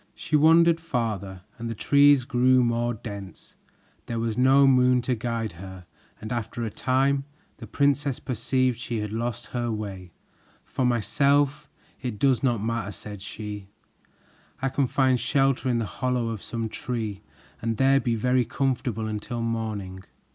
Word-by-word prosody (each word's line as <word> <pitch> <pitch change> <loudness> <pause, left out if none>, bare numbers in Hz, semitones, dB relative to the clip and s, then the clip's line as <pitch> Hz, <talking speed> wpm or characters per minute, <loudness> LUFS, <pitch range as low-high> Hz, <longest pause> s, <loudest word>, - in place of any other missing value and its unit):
She 155 - -2
wandered 165 +2 +5
farther, 110 - -3 0.2
and 115 0 -4
the 115 - -4
trees 140 +2 +5
grew 130 0 +3
more 120 0 0
dense. 100 -3 -9 0.5
There 115 - -3
was 115 -1 -1
no 135 +2 +5
moon 125 -2 +4
to 125 - 0
guide 115 -2 -3
her, 95 +1 -10 0.3
and 110 - -7
after 120 0 -3
a 110 - -4
time, 135 +3 +1 0.3
the - - -10
princess 140 -1 +1
perceived 130 0 0
she 120 -2 -4
had 105 -1 -4
lost 120 +1 -3
her 120 -1 -1
way. 100 -4 -6 0.5
"For 130 - -2
myself, 140 +5 +1 0.3
it 125 -5 -4
does 130 +1 +2
not 120 -6 +1
matter," 115 -2 -2
said 105 +1 -9
she, 105 -2 -7 0.9
"I 135 - 0
can 135 0 0
find 130 -1 +2
shelter 135 +1 +1
in 120 - +1
the 115 - -1
hollow 120 +5 -1
of 110 -4 -5
some 115 -1 -4
tree 110 -3 -4 0.4
and 115 -1 -2
there 135 +1 +4
be 120 -4 0
very 125 +3 +2
comfortable 125 -3 -2
until 110 +2 -4
morning." 105 -5 -4
120 Hz, 155 wpm, -25 LUFS, 110-130 Hz, 0.9 s, wandered